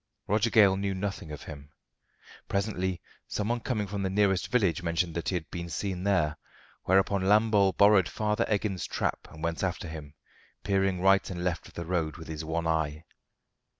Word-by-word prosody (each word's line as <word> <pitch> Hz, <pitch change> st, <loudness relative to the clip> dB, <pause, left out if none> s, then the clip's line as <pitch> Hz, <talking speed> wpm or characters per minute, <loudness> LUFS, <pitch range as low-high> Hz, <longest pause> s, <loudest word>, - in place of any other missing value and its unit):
Roger 105 Hz, +3 st, +2 dB
Gale 100 Hz, -4 st, +5 dB
knew 100 Hz, 0 st, -1 dB
nothing 95 Hz, -4 st, -4 dB
of 75 Hz, -, -7 dB
him. 70 Hz, -1 st, -10 dB, 0.8 s
Presently 95 Hz, -3 st, -1 dB, 0.3 s
someone 115 Hz, +4 st, -1 dB
coming 110 Hz, -3 st, -2 dB
from 100 Hz, +1 st, -4 dB
the 95 Hz, -, 0 dB
nearest 95 Hz, -1 st, +2 dB
village 100 Hz, -8 st, +1 dB
mentioned 85 Hz, 0 st, -1 dB
that 85 Hz, -, -2 dB
he 95 Hz, -, -1 dB
had 80 Hz, -4 st, -3 dB
been 85 Hz, -1 st, -5 dB
seen 95 Hz, +2 st, -3 dB
there; 85 Hz, -7 st, +2 dB, 0.5 s
whereupon 95 Hz, +1 st, +3 dB
Lambole 105 Hz, -1 st, +4 dB
borrowed 100 Hz, -2 st, +5 dB
Farmer 105 Hz, -1 st, 0 dB
Eggins's 100 Hz, -6 st, -1 dB
trap -, -, -2 dB
and 80 Hz, +1 st, -11 dB
went 85 Hz, 0 st, -1 dB
after 90 Hz, -2 st, -2 dB
him, 75 Hz, -2 st, -8 dB, 0.5 s
peering 95 Hz, -2 st, +1 dB
right 95 Hz, +1 st, +4 dB
and 90 Hz, -2 st, -4 dB
left 90 Hz, -1 st, -2 dB
of -, -, -18 dB
the 85 Hz, -, -5 dB
road 80 Hz, -3 st, -1 dB
with 80 Hz, -1 st, -10 dB
his 80 Hz, 0 st, -5 dB
one 80 Hz, +1 st, -2 dB
eye. 80 Hz, -1 st, -1 dB
95 Hz, 180 wpm, -28 LUFS, 85-100 Hz, 0.8 s, Gale